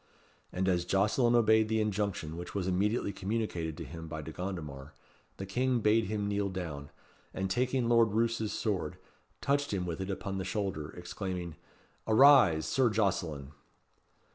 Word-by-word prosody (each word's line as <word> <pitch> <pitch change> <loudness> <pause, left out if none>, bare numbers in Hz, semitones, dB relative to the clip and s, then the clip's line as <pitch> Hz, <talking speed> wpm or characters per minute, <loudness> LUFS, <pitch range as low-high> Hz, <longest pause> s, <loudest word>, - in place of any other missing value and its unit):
And 95 +1 -1
as 90 -2 +2
Jocelyn 105 +7 +2
obeyed 110 -2 +4
the 110 0 +1
injunction 100 -7 -2
which 90 +3 -8
was 95 -2 -1
immediately 100 +3 0
communicated 95 -6 -3
to - - -5
him 80 -1 -8
by 80 -1 -6
De 80 - -7
Gondomar, 75 -7 -6 0.4
the 95 - -5
King 125 +5 0
bade 110 +1 +3
him 105 0 -2
kneel 100 -1 0
down, 80 -7 -5 0.5
and 95 0 -2
taking 125 +3 +1
Lord 115 -3 +4
Roos's 115 -1 0
sword, 95 -8 -2 0.4
touched 145 +1 0
him 95 -3 -1
with 85 +1 -4
it 95 - -4
upon 95 0 -3
the - - -2
shoulder, 95 -5 -3
exclaiming, 90 -1 -5 0.5
"Arise! 110 - +6
Sir 130 -3 +2
Jocelyn." 90 -10 -1
100 Hz, 155 wpm, -31 LUFS, 85-110 Hz, 0.5 s, Arise